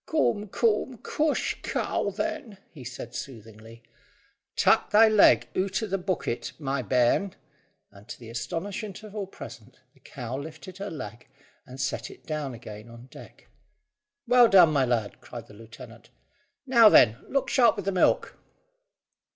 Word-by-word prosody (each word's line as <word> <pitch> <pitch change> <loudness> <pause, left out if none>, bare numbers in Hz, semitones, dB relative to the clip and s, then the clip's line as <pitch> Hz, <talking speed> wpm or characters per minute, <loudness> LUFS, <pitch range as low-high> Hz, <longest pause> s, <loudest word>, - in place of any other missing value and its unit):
"Coom, 215 -9 0
coom! 230 +4 0
Coosh, 305 0 -1
cow, - - -2
then," 270 0 -5
he 145 -6 -12
said 120 -1 -8
soothingly. 115 -2 -10 0.7
"Tak' - - +3
thy 220 +2 +6
leg 215 -2 +5
oot 190 +4 -1
o' - - 0
the 195 -2 -2
boocket, 180 -10 -3
my 140 -3 -2
bairn;" 125 - +1 0.6
and 100 0 -17
to 120 - -9
the 115 -2 -11
astonishment 190 - -5
of 215 -1 -11
all 200 -2 -4
present - - -12
the - - -26
cow 125 +2 -7
lifted 165 +5 -10
her 200 +1 -5
leg 120 -6 -9 0.4
and 130 +1 -11
set 130 +1 -3
it - - -15
down 150 -5 -4
again 110 -1 -11
on 120 +2 -14
deck. - - -14 0.8
"Well 245 -1 +6
done, 175 -5 +6
my 135 -3 +3
lad," 115 -4 -2
cried 120 -2 -9
the 115 - -16
lieutenant. 115 +2 -13 0.6
"Now, 235 -5 +7
then, 115 - +5
look 275 -1 0
sharp 235 -4 +4
with 200 -3 -6
the 195 - 0
milk." 185 - +1
155 Hz, 155 wpm, -26 LUFS, -, 0.8 s, Now